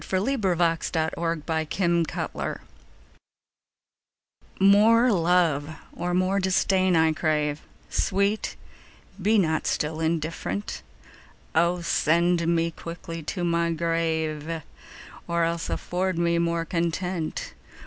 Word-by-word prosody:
1678 175 -7 0
403. 165 -1 -1
Against 155 +4 -6
Indifference 170 -3 -1 2.0
MORE 220 +5 +6
love 165 -5 +2 0.2
or 175 0 -2
more 185 +2 +2
disdain 185 -1 +2
I 160 -1 +4
crave; 150 -2 0 0.3
Sweet, 200 +2 0 0.7
be 215 +4 +3
not 160 -5 +1
still 155 +1 -1
indifferent: 160 - -2 0.7
O 170 +2 +2
send 170 +1 +2
me 165 0 +1
quickly 165 0 -7
to 175 +4 -4
my 170 -1 +1
grave, 160 -1 -1 0.6
Or 170 0 +1
else 165 0 -1
afford 185 0 -2
me 170 0 +2
more 170 0 0
content! 170 0 -2
170 Hz, 95 wpm, -25 LUFS, 160-180 Hz, 2.0 s, MORE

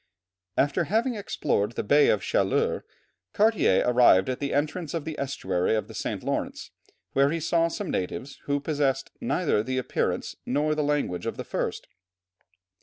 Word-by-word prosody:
After 145 +5 +2
having 225 - +1
explored 140 - -1
the - - -3
Bay 145 +8 +5
of 100 -3 +2
Chaleurs, - - +1 0.5
Cartier 210 - +3
arrived 120 -6 +5
at 130 - -2
the 140 -1 -2
entrance 155 +3 -1
of 160 -3 -3
the 160 - -4
estuary 105 -8 0
of 110 - -2
the - - -11
St. - - -4
Lawrence, - - -3 0.4
where 140 +1 +4
he 165 +2 -1
saw 165 +1 +2
some 185 +3 -4
natives, 120 +9 -4
who 145 0 0
possessed 140 -2 -1
neither 180 - +1
the 130 +4 -3
appearance 130 - -1
nor 150 +4 +1
the 155 - 0
language 145 -12 -1
of - - -3
the - - -4
first. - - -3
145 Hz, 165 wpm, -26 LUFS, 125-165 Hz, 0.5 s, Bay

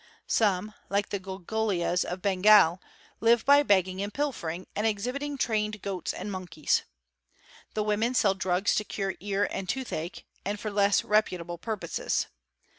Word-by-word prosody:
Some, 210 -1 +1 0.2
like 200 +1 0
the 200 - -2
Gulgulias 190 -1 -1
of 180 +1 -5
Bengal, 190 -2 +5 0.4
live 230 0 +4
by 285 +1 +7
begging 190 -6 +2
and 205 +1 -3
pilfering, 185 - -3
and 210 +2 +1
exhibiting 255 +7 -2
trained 215 -3 0
goats 190 -3 -3
and 200 +3 -5
monkeys. 180 -5 0 0.9
The 215 - +1
woman 215 +4 0
sell 200 -5 +4
drugs 185 0 +1
to 210 - +1
cure 195 -2 -3
ear 200 +2 0
and 190 -1 -4
tooth 265 -2 -2
ache, 165 +3 -5 0.2
and 205 +1 -3
for 215 0 -4
less 200 0 +3
reputable 180 -5 0
purposes. 225 - -2
205 Hz, 150 wpm, -28 LUFS, 185-215 Hz, 0.9 s, by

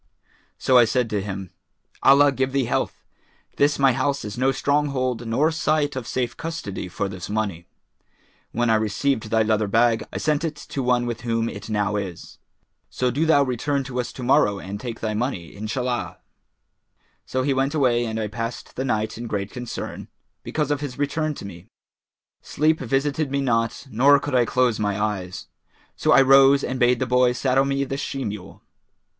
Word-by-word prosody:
So 130 -1 +4
I 120 - +7
said 120 0 0
to 105 -2 0
him, 95 -2 -6 0.5
'Allah 140 +1 +6
give 130 0 -1
thee 135 -2 +1
health! - - -2 0.5
This 145 +1 +3
my 135 -2 +4
house 140 +1 -1
is 105 0 -5
no 130 +2 +2
stronghold 135 -4 0
nor 145 +8 +2
site 155 -2 0
of 130 -3 -5
safe 120 -2 -2
custody 160 - -5
for 100 +2 -3
this 95 -2 -7
money. 100 -6 -2 0.8
When 120 -1 +1
I 110 - +4
received 110 +2 -1
thy 110 0 +3
leather 110 -1 +1
bag, 115 +2 +3
I - - -5
sent 150 +1 0
it 160 -2 -2
to 140 - -5
one 125 -1 +2
with 120 -2 -4
whom 115 -1 -1
it - - -7
now 105 -1 0
is; 95 -4 -7 0.5
so 125 -1 0
do 150 +6 0
thou 145 -3 +5
return 140 +2 -1
to 125 -1 -5
us 125 - -3
to 130 - -7
morrow 120 -6 +3
and 100 +1 -6
take 115 -1 -6
thy 110 -1 -1
money, 105 - -3
Inshallah!'[FN#418] 110 -2 -3 1.1
So 130 0 -1
he 140 +1 +1
went 135 +3 0
away 125 -5 +2
and 110 -1 -3
I 110 - -1
passed 115 +3 -6
the 130 - -2
night 110 -3 -1
in 120 - -5
great 100 -2 -3
concern, 125 -2 -6 0.3
because 150 -2 -2
of 145 -1 0
his 140 -4 -5
return 150 +2 -1
to - - -8
me; 90 -2 -10 0.7
sleep 155 +2 +1
visited 140 +3 0
me 140 +1 -1
not 115 -2 0
nor 140 +6 +5
could 145 0 -5
I 125 -2 +4
close 125 -2 +1
my 105 -1 -1
eyes; 100 -4 -3 0.5
so - - +1
I 135 - +7
rose 135 +1 +6
and 130 0 -3
bade 125 0 +4
the 130 - -1
boy 125 0 +3
saddle 130 +2 +2
me 140 0 0
the 135 0 -4
she 135 -1 -4
mule. 100 -2 -7
125 Hz, 190 wpm, -23 LUFS, 110-140 Hz, 1.1 s, I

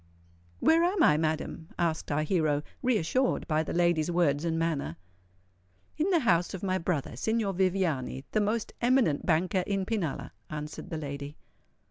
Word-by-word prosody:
"Where 330 +1 +4
am 355 0 +2
I, 150 - +6
madam?" 160 +1 -2
asked 165 -4 -1
our 150 +1 +1
hero, 155 -3 +1 0.2
reassured 255 +1 +1
by 155 -1 +2
the 160 - -4
lady's 170 -2 +2
words 165 -4 +2
and 165 -1 0
manner. 155 - -1 1.0
"In 320 +5 0
the 345 -4 +3
house 175 -6 +2
of 190 - -8
my 185 -1 0
brother, 165 -8 -2
Signor 220 - 0
Viviani, 175 -8 0
the 215 - +2
most 215 +2 -1
eminent 240 - +2
banker 180 +3 +2
in 195 -2 0
Pinalla," 195 -9 -2 0.2
answered 150 0 -6
the 160 - -3
lady. 145 -1 -6
170 Hz, 155 wpm, -29 LUFS, 155-205 Hz, 1.0 s, I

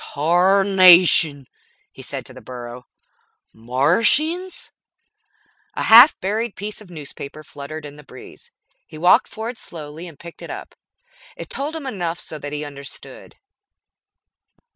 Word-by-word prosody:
"Tarnation!" 175 -2 +5 0.5
he - - -13
said - - -6
to - - -11
the - - -13
burro. 125 0 -10 0.7
"Martians?" 225 - 0 1.0
A - - -2
half 240 +7 +8
buried 215 +3 -3
piece 210 +3 -6
of 205 - -15
newspaper 155 -2 -10
fluttered 150 +1 -9
in 145 0 -11
the 150 - -14
breeze. 130 -2 -14 0.4
He 155 - -12
walked 175 +3 +4
forward 225 +2 -7
slowly 155 +1 -9
and 160 -4 -13
picked 170 +2 -13
it - - -9
up. - - -8 0.6
It - - -9
told 290 +4 -3
him 315 -3 -7
enough 175 -9 -4
so 155 - -8
that 145 0 -7
he 150 0 -4
understood. 140 - -11
170 Hz, 135 wpm, -20 LUFS, 145-210 Hz, 1.0 s, half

